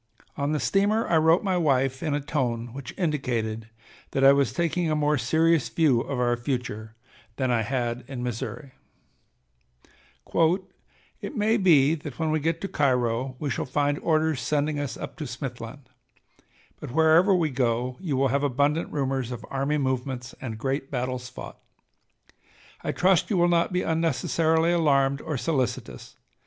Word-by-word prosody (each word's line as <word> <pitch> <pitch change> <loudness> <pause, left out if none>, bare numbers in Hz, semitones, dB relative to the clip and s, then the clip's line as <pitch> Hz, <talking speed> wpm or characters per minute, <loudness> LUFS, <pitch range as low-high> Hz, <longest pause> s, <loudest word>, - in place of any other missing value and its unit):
On 140 +1 -1
the 155 - 0
steamer 205 +6 +1
I 165 - +3
wrote 160 +3 +4
my 190 -3 +1
wife 135 -5 +1
in 150 -2 -1
a - - 0
tone 120 -5 -2
which 135 -2 -7
indicated 120 - -2 0.4
that 135 - +1
I 135 +1 +8
was 140 -4 +2
taking 170 +3 0
a 155 - +1
more 150 0 +2
serious 160 +5 +2
view 145 -8 +3
of 135 0 -4
our 120 -1 +2
future 120 -3 -4 0.4
than 130 -1 0
I 120 -2 +2
had 120 +1 -2
in 130 -3 -5
Missouri: 125 +3 -5 2.5
"It - - -6
may 220 0 +2
be 160 -8 +5
that 150 -4 -6
when 160 -1 0
we 155 - +1
get 165 +2 -1
to 195 - -2
Cairo 130 -4 0
we 145 +1 -3
shall - - -2
find 145 +2 0
orders 155 -4 +1
sending 145 +3 0
us 145 -2 -4
up - - -7
to 155 -4 -5
Smithland, 125 +1 -7 0.9
but - - -7
wherever 160 +7 +4
we 165 -4 +1
go 125 0 -1
you 155 -8 -2
will 135 0 +2
have 140 +2 +1
abundant 145 +3 0
rumors 135 -3 -2
of 120 -2 -6
army 140 +2 0
movements 130 -2 -2
and 115 -4 -5
great 135 +3 -2
battles 125 -1 -3
fought. 125 - -10 1.2
I - - -1
trust 185 -2 +2
you 205 - +1
will 175 0 +4
not 170 0 +2
be 180 0 0
unnecessarily 160 +1 +1
alarmed 140 -5 +2
or 150 -3 -3
solicitous. 130 -4 -3
140 Hz, 165 wpm, -26 LUFS, 125-160 Hz, 2.5 s, I